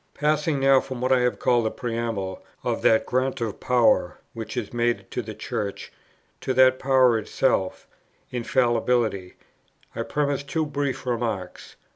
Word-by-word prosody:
Passing 150 0 +1
now 135 0 +6
from 130 -2 -6
what 130 +1 0
I 130 - +5
have 125 0 +1
called 120 -1 +2
the 110 - +1
preamble 115 -6 -4 0.2
of - - -1
that 110 - +4
grant 130 +1 -1
of 115 -3 -3
power, 125 -2 +2 0.2
which 110 +1 -7
is 120 -2 -4
made 120 -5 -1
to - - -2
the 110 -2 -8
Church, 100 0 -5 0.5
to 130 - -2
that 130 0 +5
power 130 -4 +4
itself, 105 -3 -1 0.5
Infallibility, 120 -5 0 0.6
I - - -2
premise 145 -2 -1
two 140 +3 -2
brief 140 -3 -3
remarks: 115 -7 -3
1. - - -38
125 Hz, 155 wpm, -24 LUFS, 110-130 Hz, 0.6 s, now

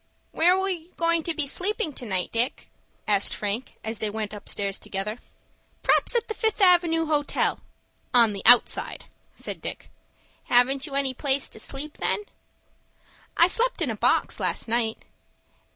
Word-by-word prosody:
"Where 355 +3 +3
are 385 0 0
you 355 -2 -5
going 335 0 +2
to 315 -3 -2
sleep 390 +9 0
to 300 - -4
night, 185 -3 -1
Dick?" 235 +4 -2 0.4
asked 200 -2 +2
Frank, 210 +5 -3
as 220 0 -4
they 215 - -2
went 215 0 -5
upstairs 200 -1 -3
together. 210 +4 -4 0.6
"P'r'aps - - +3
at 475 0 +1
the 440 - -3
Fifth 440 -1 -1
Avenue 345 -4 +4
Hotel—on 280 -5 0
the 200 - -5
outside," 245 +1 +4 0.3
said - - -6
Dick. - - -7 0.5
"Haven't 265 +4 +2
you 275 - -7
any 275 -2 +2
place 270 +1 0
to - - -10
sleep, 285 +6 -5
then?" 420 - 0 1.1
"I 340 - +7
slept 475 +6 0
in - - 0
a - - -4
box, - - +1
last - - -2
night." 225 -1 0
275 Hz, 150 wpm, -25 LUFS, 220-340 Hz, 1.1 s, I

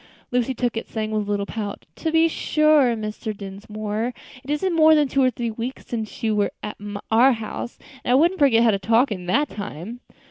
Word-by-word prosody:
Lucy 250 +1 0
took 245 -1 -1
it, 225 - -4
saying 215 -1 -3
with 215 -1 -1
a - - -6
little 200 -1 0
pout, 205 -1 -5
"To 320 - -2
be 325 +1 +5
sure, 305 -6 +3
Mr. 215 0 -5
Dinsmore, 210 +4 -4 0.3
it 270 - -13
isn't 335 +5 0
more 315 -1 +7
than 300 -2 +3
two 275 +1 +1
or 255 - +5
three 240 -2 -3
weeks 235 +4 -6
since 225 0 -5
you 220 -1 +1
were 205 -1 +2
at 210 - -5 0.4
our 250 +4 +6
house, 225 +1 -6 0.3
and - - 0
I - - +6
wouldn't 340 +7 +3
forget 245 -6 +5
how 230 - +5
to 200 - 0
talk 230 +5 +3
in 180 -3 -5
that 290 +11 +2
time." 205 +3 -7
230 Hz, 215 wpm, -23 LUFS, 215-270 Hz, 0.4 s, more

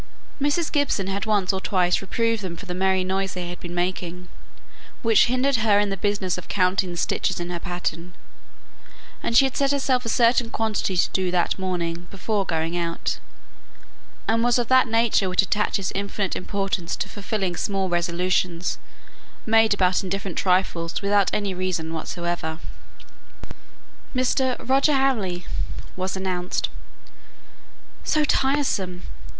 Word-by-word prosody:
Mrs. 290 +3 +1
Gibson 285 -10 +1
had 195 +2 -3
once 205 -3 +2
or 190 - -2
twice 180 -3 +2
reproved 230 +3 0
them 180 -3 -5
for 200 - -9
the 180 - -4
merry 190 0 +2
noise 190 +1 -1
they 175 -1 -4
were 175 - -6
making, 180 0 -3 0.7
which 225 -2 +5
hindered 255 +2 +2
her 215 -2 +4
in 205 -1 +1
the - - 0
business 195 -2 -1
of - - -11
counting 185 -1 +1
the 175 - -6
stitches - - 0
in 175 0 -4
her 175 - -3
pattern; 175 0 -4 1.1
and 230 - +2
she 270 - +7
had 265 - -2
set 275 -1 +2
herself 265 -3 +1
a 230 - -3
certain 235 0 +3
quantity 220 -5 -1
to - - +4
do 185 -1 0
that 180 +1 +1
morning 175 -2 -2
before 200 0 -2
going 165 +1 -1
out, 170 -1 -2 1.1
and 225 +1 +2
was 240 0 +4
of 240 -2 -1
that 260 -1 +6
nature 225 -4 +2
which 180 +1 +3
attaches 200 -1 0
infinite 200 0 -2
importance 195 -3 -2
to - - -3
fulfilling 200 -3 -3
small 195 0 -1
resolutions, 175 0 0 0.7
made 225 0 +4
about 185 -2 +3
indifferent 195 -1 -3
trifles 180 -3 +1
without 200 -1 +3
any 200 -2 -1
reason 180 -3 -2
whatever. 170 0 -3 1.6
"Mr. 255 0 +2
Roger 275 +3 +4
Hamley," 220 -10 +1 0.5
was 190 0 -3
announced. 185 -1 -2 1.3
"So 305 -1 +2
tiresome!" 265 -12 +1
190 Hz, 145 wpm, -24 LUFS, 180-225 Hz, 1.6 s, she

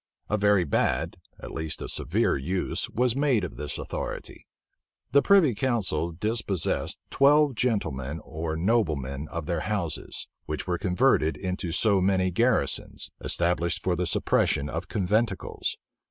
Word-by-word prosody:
A - - +3
very 100 -2 +4
bad, 75 - 0 0.2
at - - -8
least 80 -1 -3
a - - -5
severe - - +1
use 90 +7 -2
was 125 +1 +1
made 135 -7 +2
of 90 - -5
this 75 -1 -4
authority. - - -6 0.6
The 140 +2 +6
privy 185 -9 +5
council 100 - 0
dispossessed 100 0 -1
twelve 145 +1 +5
gentlemen 80 - -1
or 80 0 -4
noblemen 80 - 0
of 85 0 -5
their 85 0 -1
houses;[*] 85 -3 -3 0.2
which 75 0 -3
were 90 -2 -1
converted 95 -3 +2
into 90 -2 -3
so 100 +3 +2
many 95 -1 +2
garrisons, 115 - 0
established 85 0 +1
for 90 -1 +1
the 90 0 -1
suppression 75 -2 +1
of 85 +3 -4
conventicles. 110 +3 -1
90 Hz, 140 wpm, -27 LUFS, 80-110 Hz, 0.6 s, The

